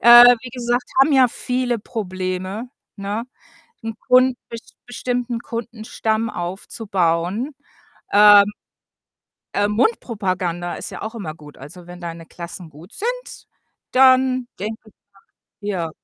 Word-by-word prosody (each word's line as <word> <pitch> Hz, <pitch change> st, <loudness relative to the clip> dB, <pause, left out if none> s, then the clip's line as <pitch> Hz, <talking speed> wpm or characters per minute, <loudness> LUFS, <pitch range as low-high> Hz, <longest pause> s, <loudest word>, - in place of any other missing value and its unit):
äh, 240 Hz, +1 st, +10 dB
wie 250 Hz, -, -8 dB
gesagt, 245 Hz, 0 st, -1 dB, 0.2 s
haben 285 Hz, +2 st, +5 dB
ja 260 Hz, -2 st, +6 dB
viele 250 Hz, -1 st, -2 dB
Probleme, 185 Hz, 0 st, -4 dB, 0.3 s
ne, 205 Hz, +4 st, -3 dB, 0.6 s
'n 225 Hz, 0 st, -4 dB
Kun 255 Hz, 0 st, +5 dB
be 230 Hz, -, -6 dB, 0.3 s
bestimmten 245 Hz, -1 st, -3 dB
Kundenstamm 225 Hz, -1 st, -3 dB
aufzubauen, 190 Hz, -, -2 dB, 0.6 s
ähm 205 Hz, 0 st, +8 dB, 1.0 s
äh, 205 Hz, 0 st, +2 dB
Mundpropaganda 185 Hz, -, -1 dB
ist -, -, -5 dB
ja -, -, -8 dB
auch 220 Hz, +2 st, -5 dB
immer 170 Hz, -9 st, -5 dB
gut. 150 Hz, -2 st, -14 dB
Also, 170 Hz, +6 st, -12 dB
wenn 175 Hz, 0 st, -11 dB
deine 165 Hz, -1 st, -7 dB
Klassen 170 Hz, 0 st, -9 dB
gut 160 Hz, +8 st, -15 dB
sind, -, -, -5 dB, 0.5 s
dann 255 Hz, -1 st, +5 dB
denke 215 Hz, +4 st, -3 dB
ich -, -, -20 dB
doch -, -, -66 dB, 0.6 s
ja. 185 Hz, -6 st, -2 dB
220 Hz, 125 wpm, -21 LUFS, 185-245 Hz, 1.0 s, äh